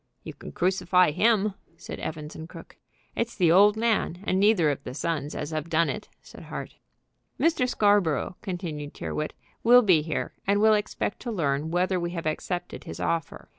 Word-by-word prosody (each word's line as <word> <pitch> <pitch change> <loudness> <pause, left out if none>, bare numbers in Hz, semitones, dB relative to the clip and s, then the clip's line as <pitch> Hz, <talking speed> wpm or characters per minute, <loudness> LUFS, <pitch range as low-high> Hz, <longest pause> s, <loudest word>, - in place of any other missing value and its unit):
"You - - -7
can - - -10
crucify 180 -1 +2
him," 210 +3 +2 0.2
said - - -8
Evans 155 -1 -6
& 160 - -11
Crooke. - - -12 0.4
"It 230 - 0
is 235 - -14
the 175 -4 +3
old 205 +4 +6
man, 220 -5 0
and 185 -1 0
neither 195 -7 +4
of 140 0 -5
the 125 - -7
sons, 150 -1 -2
as 150 - -4
have 155 +1 -3
done 165 0 +2
it," - - -7
said - - -13
Hart. - - -7 0.6
"Mr. 315 -7 +2
Scarborough," 200 - +2
continued 170 -8 -5
Tyrrwhit, 155 - -4 0.3
"will 245 +2 +7
be 180 -7 +5
here, 155 0 -3
and 200 +1 +3
will 220 +1 +5
expect 210 -1 -2
to 240 - -5
learn 150 -5 -1
whether 180 +2 +1
we 170 0 -2
have 165 - -4
accepted 175 +3 -3
his - - -7
offer. 165 -3 -3
180 Hz, 185 wpm, -26 LUFS, 155-205 Hz, 0.6 s, will